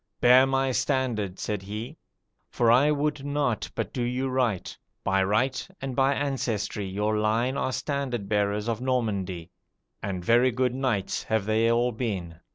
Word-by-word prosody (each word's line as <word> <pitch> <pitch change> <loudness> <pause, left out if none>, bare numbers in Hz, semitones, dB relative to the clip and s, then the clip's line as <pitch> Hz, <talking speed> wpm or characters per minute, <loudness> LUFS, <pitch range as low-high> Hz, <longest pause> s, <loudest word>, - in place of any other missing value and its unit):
'Bear 125 +2 +6
my 135 0 +1
standard,' 125 -7 -1
said 105 -2 -3
he, 105 +8 -6 0.5
'for 115 -1 +3
I 135 +5 +5
would 150 -1 0
not 140 -6 -1
but - - -3
do 125 - -2
you 125 +2 -1
right; 125 -7 -1 0.3
by 95 0 +2
right 125 +7 0
and 135 -2 -4
by 135 +1 +3
ancestry 120 -7 -2
your 105 +3 0
line 115 +5 +1
are 135 -2 -1
standard 130 -7 -2
bearers 105 +1 0
of 115 0 -2
Normandy, 100 -9 -2 0.5
and 95 -3 -4
very 120 +2 +5
good 125 0 0
knights 125 -7 -1
have 110 -3 -1
they 110 +2 +2
all 120 +1 +2
been.' 95 -8 -4
120 Hz, 160 wpm, -26 LUFS, 105-130 Hz, 0.5 s, Bear